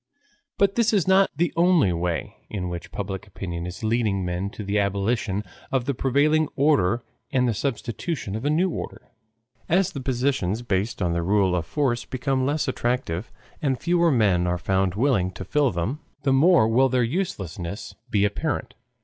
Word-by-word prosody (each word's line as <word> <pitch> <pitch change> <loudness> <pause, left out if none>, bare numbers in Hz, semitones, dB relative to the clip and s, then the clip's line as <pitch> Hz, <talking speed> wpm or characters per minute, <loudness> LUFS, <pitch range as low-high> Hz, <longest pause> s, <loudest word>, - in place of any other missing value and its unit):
But 200 0 +3
this 230 0 +2
is 195 -5 +2
not 190 +1 +5
the 170 +3 0
only 170 - +4
way 85 0 -2
in 90 -4 -3
which 85 -1 -6
public 95 0 -5
opinion 85 -3 -5
is 90 +5 -8
leading 110 -4 +1
men 90 +2 -2
to 105 - -8
the 100 +1 0
abolition 100 +1 0 0.3
of 130 -3 0
the 140 - 0
prevailing 145 +5 +2
order 120 -6 +2 0.3
and 125 -1 +2
the 120 - +1
substitution 120 - -3
of 110 - -4
a 145 - +1
new 165 +5 +3
order. - - -7 0.6
As 180 +2 +3
the 140 - -6
positions 125 -5 0
based 100 -1 -1
on 85 -1 +1
the 85 - 0
rule 95 0 +2
of 85 -2 -2
force 120 - 0
become 130 0 -1
less 150 +1 0
attractive 120 -7 -2 0.3
and 135 -4 0
fewer 170 -1 +3
men 100 - +3
are 90 0 0
found 95 0 0
willing 110 -6 +2
to 95 - -7
fill 145 - +2
them, 100 - -2 0.2
the 135 -1 +3
more 155 -3 +5
will 130 +4 +4
their 125 -1 +2
uselessness 100 - -4 0.2
be 105 -3 +2
apparent. 105 - -2
115 Hz, 175 wpm, -24 LUFS, 95-140 Hz, 0.6 s, not